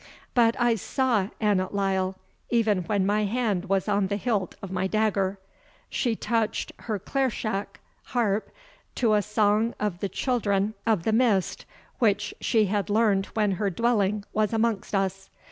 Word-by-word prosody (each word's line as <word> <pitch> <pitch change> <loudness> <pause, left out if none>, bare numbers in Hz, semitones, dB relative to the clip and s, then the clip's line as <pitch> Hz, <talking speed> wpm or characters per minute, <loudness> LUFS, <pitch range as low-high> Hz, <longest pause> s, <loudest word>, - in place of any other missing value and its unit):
But 230 -1 +3
I 240 -1 +4
saw 225 -1 0
Annot 200 -3 +1
Lyle, 190 -1 0 0.3
even 220 -4 +2
when 200 +1 +1
my 210 +1 +2
hand 205 -4 0
was 195 0 0
on 200 -1 +2
the 200 +1 -1
hilt 205 -4 -1
of 195 - -8
my 190 0 0
dagger. 200 -2 +1 0.5
She 240 -4 0
touched 225 -1 -1
her 215 -3 -3
clairshach 215 -3 -2 0.3
[Harp] 215 -4 0 0.5
to 230 -4 +2
a 210 - +4
song 210 +2 +1
of 205 -5 -2
the 200 - -2
Children 210 -5 0
of 215 -7 +2
the 220 - +1
Mist, 220 -6 +1 0.3
which 210 -3 +1
she 220 -2 +3
had 205 +1 -1
learned 205 -2 +2
when 210 -2 +2
her 200 +1 0
dwelling 210 -1 +1
was 215 +1 +1
amongst 225 -2 0
us. 195 0 -1
210 Hz, 155 wpm, -26 LUFS, 195-225 Hz, 0.5 s, I